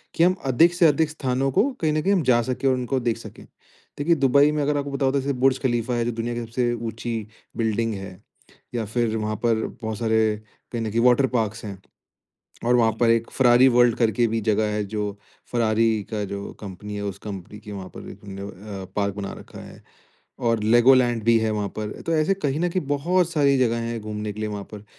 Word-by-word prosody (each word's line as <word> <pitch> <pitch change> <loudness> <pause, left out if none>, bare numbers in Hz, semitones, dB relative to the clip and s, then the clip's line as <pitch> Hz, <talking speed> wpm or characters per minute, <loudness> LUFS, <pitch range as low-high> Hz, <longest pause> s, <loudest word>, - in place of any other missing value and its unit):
कि 165 - +3
हम 185 +1 +4
अधिक 165 +7 +4
से 170 -2 +5
अधिक 150 +1 +2
स्थानों 135 -2 -1
को 170 - +3 0.2
कहीं 155 -1 +2
न 155 - +1
कहीं 195 +5 +2
हम 185 - +2
जा 120 -2 +4
सके 130 +3 -2
और 130 - +4
उनको 130 +1 -1
देख 120 -2 -1
सके? - - -11
देखिए 165 +4 -4
दुबई 140 +1 +4
में 150 0 -1
अगर 145 0 +1
आपको 140 0 -3
पता 140 0 -1
होता 135 +1 +2
है - - 0
जैसे 140 - -1
बुर्ज 135 0 +3
ख़लीफ़ा 120 -2 0
है। 120 -1 0
जो 120 - 0
दुनिया 115 +1 -3
की 120 - -3
सबसे 120 +1 -1
ऊँची 115 -1 -4 0.3
बिल्डिंग 115 0 0
है 95 -1 -8 0.6
या 115 -2 -1
फिर 115 0 -1
वहाँ 110 0 -2
पर 110 -1 +2 0.2
बहुत 110 -1 -3
सारे 110 -2 +1 0.3
कहीं 120 - -2
न 110 - -2
कहीं 115 - +1
वाटर 125 +2 +5
पार्क्स 110 0 -1
हैं। 100 -2 -6 0.9
और 125 +1 +4
वहाँ 115 -2 +4
पर 120 - +4
एक 115 0 +2
फ़ेरारी 125 0 +5
वर्ल्ड 120 -2 +4
करके 115 0 +2
भी 115 +1 -1
जगह 110 0 +1
है 105 0 -1
जो 105 0 -3 0.4
फ़ेरारी 110 -2 +2
का 105 -1 -2
जो 100 +1 -6
कंपनी 105 +1 -8
है 105 - -4
उस 100 -1 -4
कंपनी 100 0 -7
के 105 0 -11
वहाँ 95 -2 -7
पर - - -9
एक - - -15
उन्होंने 100 0 -8
अ, - - -7
पार्क 100 -1 0
बना 100 -1 -5
रखा - - -12
है। - - -13 0.6
और 115 -2 +1
लेगो 120 +4 +6
लैंड 120 -3 +2
भी 115 0 +5
है 110 -1 0
वहाँ 105 -1 -2
पर। 105 -1 -3 0.2
तो 165 - 0
ऐसे 155 +5 +2
कहीं 150 -6 -2
न 175 - +1
कहीं 185 +2 -1
बहुत 170 +5 +1
सारी 140 -4 +3
जगह 115 -2 +2
हैं 115 -1 -3
घूमने 105 0 -5
के 105 - -9
लिए 110 - -2
वहाँ 105 -1 -5
पर। 105 -1 -9
115 Hz, 235 wpm, -24 LUFS, 105-135 Hz, 0.9 s, लेगो